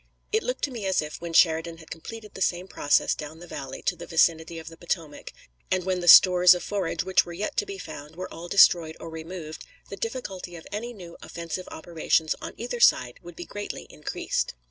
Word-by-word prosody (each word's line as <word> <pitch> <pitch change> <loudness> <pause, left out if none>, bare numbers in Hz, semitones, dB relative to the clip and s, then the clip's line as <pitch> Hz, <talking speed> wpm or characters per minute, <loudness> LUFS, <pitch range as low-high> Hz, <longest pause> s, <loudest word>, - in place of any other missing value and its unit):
It 440 +1 +2
looked - - -4
to 285 - 0
me 225 -6 -4
as 190 - +2
if, 150 +1 -4
when 170 -1 -5
Sheridan 165 0 +3
had 160 -1 -15
completed 210 +6 -9
the 190 - -9
same 180 0 0
process 145 -5 +2
down 155 +1 -7
the 175 - -11
valley 135 -5 -7
to - - 0
the - - -10
vicinity 165 0 +2
of 160 - -9
the 165 - -9
Potomac, 165 -3 -4 0.4
and 185 -1 +1
when 185 -1 0
the 175 - -4
stores 180 0 +9
of 180 - -5
forage 190 -5 -2
which 190 0 +3
were 175 - -9
yet 205 +5 -3
to 420 - +1
be 395 0 -6
found 150 - -9
were 185 +1 -7
all 170 +2 -8
destroyed 170 -4 +5
or 165 - -8
removed, 160 -1 -7 0.3
the - - -4
difficulty 195 -6 -5
of 165 - -11
any 230 +4 -4
new 180 -7 -11
offensive 170 +1 -6
operations 160 -1 0
on - - -7
either 240 +1 -4
side 125 - +4
would 175 -1 -11
be 175 - -7
greatly 205 0 -6
increased. - - -3
175 Hz, 215 wpm, -26 LUFS, 160-190 Hz, 0.4 s, stores